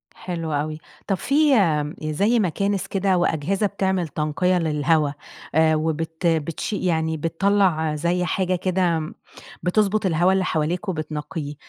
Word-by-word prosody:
حلو 165 -3 -5
أوي. 155 +2 -2 0.3
طَب 195 - +1
فيه، 290 - +3
آمم، 155 -8 +1
زي 200 +10 +1
مكانس 195 +1 0
كده 195 -1 +1
وأجهزة 175 +4 0
بتعمل 190 -3 -1
تنقية 155 +5 0
للهوا، 155 -2 +1 0.4
آآ، 160 0 +4
وبت 160 +2 -2
بتشي 165 +5 -1
يعني 160 -2 0
بتطلع 165 -1 +1
زي 175 +3 0
حاجة 185 +2 0
كده 175 -3 0 0.5
بتضبط 205 +3 +1
الهوا 175 +1 +3
اللي 190 0 +2
حواليك 175 +6 -1
وبتنقيه، 155 -2 -4
170 Hz, 130 wpm, -23 LUFS, 155-190 Hz, 0.5 s, آآ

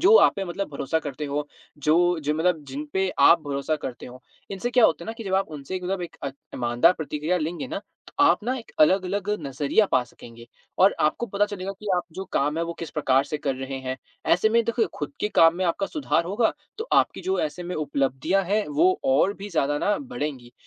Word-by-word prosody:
जो 395 +6 +6
आप - - +6
पे 195 - -2
मतलब 185 +2 -4
भरोसा 140 +3 -1
करते 145 -1 -5
हों, 145 +1 -1 0.4
जो 170 +4 +3
जो 150 +1 -1
मतलब 160 -2 0
जिन 140 +3 -5
पे 190 0 +1
आप 170 - +7
भरोसा 140 +2 -1
करते 130 -4 -7
हों। 125 +1 -11 0.3
इनसे 200 +5 -3
क्या 245 -2 +5
होता 165 +2 +2
है - - -12
ना 225 - -3
कि 225 - -7
जब 190 -1 -1
आप 195 -2 +1
उनसे 150 +4 -6
मतलब 185 0 -2
एक 170 - -8
अ, 140 - -1 0.3
ईमानदार 120 +8 +3
प्रतिक्रिया 155 +1 -2
लेंगे 170 +10 -3
ना - - -3 0.3
तो - - -15
आप - - +4
ना 255 +2 0
एक 230 - -12
अलग-अलग 190 +4 +3 0.2
नज़रिया 145 +10 +2
पा 125 - +4
सकेंगे 115 0 -14 0.3
और 195 +2 +5
आपको 155 +10 +1
पता 200 +1 +1
चलेगा 195 -1 -5
कि 210 - -11
आप 180 - 0
जो 190 - -5
काम 150 +3 +1
है, 170 - 0
वो 170 - -4
किस 165 -1 -7
प्रकार 135 -2 +2
से 150 - -3
कर 140 -2 -1
रहे 135 +1 -5
हैं। 130 0 -4 0.4
ऐसे 195 +5 +4
में 230 +1 +3
देखो 230 -1 +1
खुद 145 -2 -4
के 210 - +1
काम 165 0 +6
में 185 - -1
आपका 180 +3 0
सुधार 280 - 0
होगा 210 +6 +1 0.3
तो 445 - -3
आपकी - - +3
जो 380 +1 0
ऐसे 155 +4 -3
में 180 +1 -5
उपलब्धियाँ 145 +5 0
हैं, 210 +3 0
वो 350 +6 +3
और 265 -7 +3
भी 200 +1 -7
ज़्यादा 145 -3 +1
ना 205 +5 +1
बढ़ेंगी। 150 - -5
170 Hz, 230 wpm, -25 LUFS, 145-200 Hz, 0.4 s, आप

